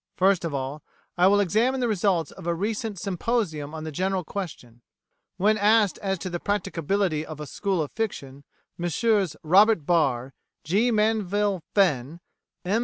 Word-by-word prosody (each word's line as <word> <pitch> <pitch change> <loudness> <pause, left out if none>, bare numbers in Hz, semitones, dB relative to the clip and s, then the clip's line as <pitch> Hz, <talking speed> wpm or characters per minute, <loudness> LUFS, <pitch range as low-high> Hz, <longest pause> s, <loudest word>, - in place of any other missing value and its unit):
First 190 -1 +3
of 165 - -2
all, 140 +2 -4 0.3
I 180 +1 +4
will 205 +1 +4
examine 220 +8 +2
the 245 - +1
results 195 -5 +1
of 185 -3 -10
a 170 - +1
recent 210 +3 -3
symposium 175 -6 -2
on 155 - -6
the 155 - -5
general 185 +4 -1
question.[1:A] 145 - -7 0.6
When 215 +3 +2
asked 210 -1 +3
as 195 -1 -1
to 185 - -5
the 175 - -3
practicability 195 -4 -1
of 155 -1 -9
a 150 - -5
School 190 +3 -1
of 145 - -7
Fiction, 140 -11 -5 0.4
Messrs 190 +1 +1
Robert 190 +1 +5
Barr, 135 -7 +1 0.3
G. 205 +10 +2
Manville 210 -3 +1
Fenn, 160 -6 +2 0.5
M. 200 +5 +1
190 Hz, 160 wpm, -25 LUFS, 160-210 Hz, 0.6 s, Robert